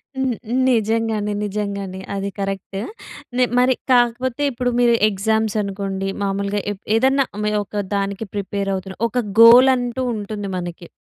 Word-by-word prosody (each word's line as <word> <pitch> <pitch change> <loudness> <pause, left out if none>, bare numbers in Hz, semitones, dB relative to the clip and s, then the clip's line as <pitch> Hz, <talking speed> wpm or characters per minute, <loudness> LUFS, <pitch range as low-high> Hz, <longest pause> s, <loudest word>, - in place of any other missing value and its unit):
హ్మ్. 265 -2 0
హ్మ్. 245 - 0
నిజంగానే, 220 -2 0
నిజంగానే 200 -2 -4
అది 195 0 -2
కరెక్ట్. 195 0 -4 0.6
నె 255 - +4
మరి 255 +1 +4 0.2
కాకపోతే, 245 +1 +2
ఇప్పుడు 250 0 -1
మీరు 240 -1 +4 0.2
ఎగ్జామ్స్ 220 +2 0
అనుకోండి. 195 -1 -3 0.2
మామూలుగా 200 +1 -1
ఎప్ 200 -1 -8
ఏదన్నా 265 +4 +3 0.2
మే 210 - +1
ఒక 205 +1 -4
దానికి 200 +2 -2
ప్రిపేర్ 200 0 -3
అవుతున్నా. 190 0 -5
ఒక 245 +2 -1 0.2
గోల్ 240 +3 +9
అంటూ 245 0 -3
ఉంటుంది 205 -1 -5
మనకి. 175 -1 -6
210 Hz, 140 wpm, -20 LUFS, 195-240 Hz, 0.6 s, గోల్